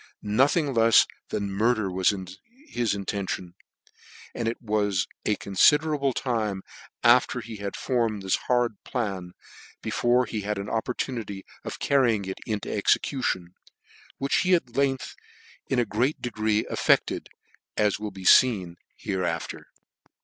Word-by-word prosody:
Nothing 135 +7 +2
lefs 115 -1 +6 0.2
than 100 -1 -2
murder 110 -1 +1
was 95 +2 +3 0.6
his 115 -4 0
intention; 95 -2 -4 0.8
but 115 - -3
it 115 - -2
was 105 -4 0 0.2
a 105 - +3
confiderable 145 +9 +3
time 110 -7 -2 0.4
after 125 +1 +5
he 115 -2 -8
had 100 -1 -5
formed 115 -6 -1
this 95 - +2
horrid 120 -3 +1
plan 95 -8 -3 0.5
before 125 +1 +2
he 110 -3 -4
had 105 +1 -2
an 100 +1 -5
opportunity 115 -3 -3 0.2
of - - -6
carrying 120 -8 +2
it 95 0 -5
into' 105 -2 -3
execution, 100 -4 0 0.6
which 140 0 +1
he 185 0 +4
at 130 -9 -3
length 135 -1 0 0.5
in 130 - +1
a 120 - +3
great 120 +8 0
degree 110 -3 0
effected, - - +1 0.5
as 105 -1 +2
will 105 0 -4
be 95 -1 -11
feen 95 -7 +5 0.2
hereafter. 90 -4 -3
110 Hz, 130 wpm, -26 LUFS, 100-125 Hz, 0.8 s, lefs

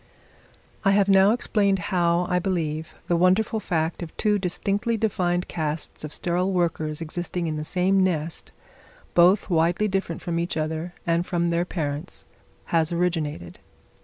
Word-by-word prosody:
I 195 -1 +4
have 200 -1 +3
now 195 0 +6
explained 205 -4 +1 0.2
how, 175 0 +2
I 180 -1 +1
believe, 160 -4 -2
the 175 - +2
wonderful 185 +6 +3
fact 165 -5 -1
of 165 -2 -8
two 210 -1 +2
distinctly 200 +5 -1
defined 180 -5 0
castes 155 -2 -4
of 155 - -5
sterile 180 +4 -1
workers 165 -3 -1
existing 175 +2 -3
in 155 -1 -2
the 150 - -3
same 185 +4 +2
nest, 165 -3 -2 0.6
both 185 +3 +4
widely 170 +5 +2
different 190 -4 -2
from 170 -2 -1
each 170 -1 -2
other 160 +3 -3
and 170 0 +2
from 170 -1 0
their 170 +1 +1
parents, 155 -2 -4 0.4
has 165 -1 +1
originated. 165 - -2
175 Hz, 150 wpm, -24 LUFS, 160-190 Hz, 0.6 s, now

